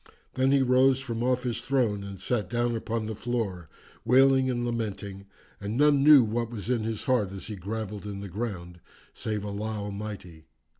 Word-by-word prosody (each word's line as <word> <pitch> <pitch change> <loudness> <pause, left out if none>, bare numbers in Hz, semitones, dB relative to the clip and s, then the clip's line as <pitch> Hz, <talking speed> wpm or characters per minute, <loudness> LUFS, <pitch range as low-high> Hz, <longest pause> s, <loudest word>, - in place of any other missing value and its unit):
Then 130 +1 +2
he 140 -1 +4
rose 130 +1 +4
from 120 -4 -4
off 125 +1 +1
his 120 -2 -2
throne 115 -7 0
and 100 -1 -8
sat 105 -1 -1
down 120 +1 0
upon 115 0 -2
the 110 - -3
floor 105 -7 -3 0.3
wailing 130 +2 +5
and 120 -1 -1
lamenting 100 -4 -4 0.3
and 100 +3 -4
none 145 -1 +4
knew 145 -3 +9
what 115 +1 -2
was 115 0 -4
in 115 -2 0
heart 110 -3 0
as 95 -1 -8
he 110 - -6
grovelled 105 +1 -5
in 100 -1 -5
the 100 - -6
ground 90 -4 -5 0.3
save 105 -2 -3
Allah 105 +2 -3
Almighty." 100 -6 -7
110 Hz, 180 wpm, -27 LUFS, 100-125 Hz, 0.3 s, knew